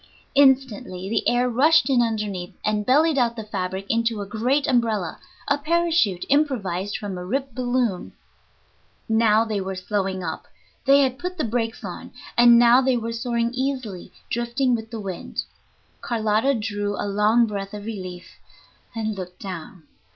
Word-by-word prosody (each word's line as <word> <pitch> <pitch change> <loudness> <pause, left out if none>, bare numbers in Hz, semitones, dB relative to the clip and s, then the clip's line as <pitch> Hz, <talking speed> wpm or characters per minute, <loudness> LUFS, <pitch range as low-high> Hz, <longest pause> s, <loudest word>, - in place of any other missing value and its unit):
Instantly 255 -9 +2
the 225 - +1
air 245 +1 +2
rushed 305 +7 +4
in 260 -3 +3
underneath, 210 -6 -2
and 210 -1 0
bellied 295 +3 +4
out 235 -1 +1
the 220 - -5
fabric 190 -2 -4
into 230 -1 0
a 200 - -4
great 245 +8 0
umbrella, 225 -7 0 0.3
a 285 0 +2
parachute 325 - +1
improvised 205 - 0
from 195 -3 -5
a - - -6
ripped 265 +7 -3
balloon. 245 -6 -1 1.0
Now 220 -1 +3
they 215 -3 -2
were 190 0 -4
slowing 190 -1 -2
up; 160 -2 -5 0.4
they 280 +1 +6
had 260 -1 0
put 360 +2 -5
the 310 - -1
brakes 230 0 -2
on, - - -7 0.3
and 240 0 +7
now 240 +2 +6
they 260 -1 +2
were 230 0 -3
soaring 235 0 -1
easily, 255 -8 -3 0.2
drifting 240 +2 0
with 225 -1 -6
the 225 -1 -6
wind. 195 -3 -5 0.6
Carlotta 225 +3 +1
drew 205 -2 -2
a - - -1
long 210 +4 +3
breath 200 -1 -5
of 205 0 -8
relief 185 -5 -8 0.6
and 220 -1 -2
looked 180 -2 -8
down. 180 -2 -8
225 Hz, 160 wpm, -23 LUFS, 200-255 Hz, 1.0 s, and